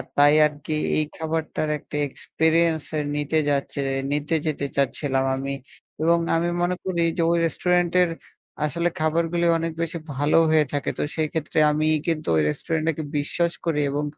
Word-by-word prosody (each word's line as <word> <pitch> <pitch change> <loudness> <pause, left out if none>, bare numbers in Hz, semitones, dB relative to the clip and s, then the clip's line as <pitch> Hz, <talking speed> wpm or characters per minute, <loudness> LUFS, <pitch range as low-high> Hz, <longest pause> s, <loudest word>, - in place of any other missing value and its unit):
তাই 145 +1 +6
আরকি 150 +1 -6 0.2
এই 155 - +2
খাবারটার 160 -1 -2
একটা 150 - -10
এক্সপেরিয়েন্স 160 +2 +1
এ - - +1 0.2
নিতে 150 +2 0
যাচ্ছে। 140 0 -1 0.3
নিতে 150 +3 0
যেতে 150 -2 -1
চাচ্ছিলাম 135 -1 0
আমি 135 +1 -3 0.5
এবং 170 +2 +4 0.2
আমি 170 +1 +1
মনে 175 +1 +1
করি 180 -2 -1 0.2
যে - - +1
ওই 170 - +3
রেস্টুরেন্টের 180 +1 +2 0.6
আসলে 170 +4 0
খাবারগুলো 165 +2 +1
অনেক 165 0 -2
বেশি 165 +1 -2 0.2
ভালো 145 +4 +2
হয়ে 155 -1 +4
থাকে। 145 - -1
তো - - +1
সেই 155 -1 +1
ক্ষেত্রে 160 0 -1
আমি 155 +1 0 0.2
কিন্তু 160 -2 -1
ওই 80 - +4
রেস্টুরেন্টটাকে 160 - -2
বিশ্বাস 170 +4 0
করি 155 -3 +1
এবং 145 +1 -1
155 Hz, 155 wpm, -24 LUFS, 145-165 Hz, 0.6 s, তাই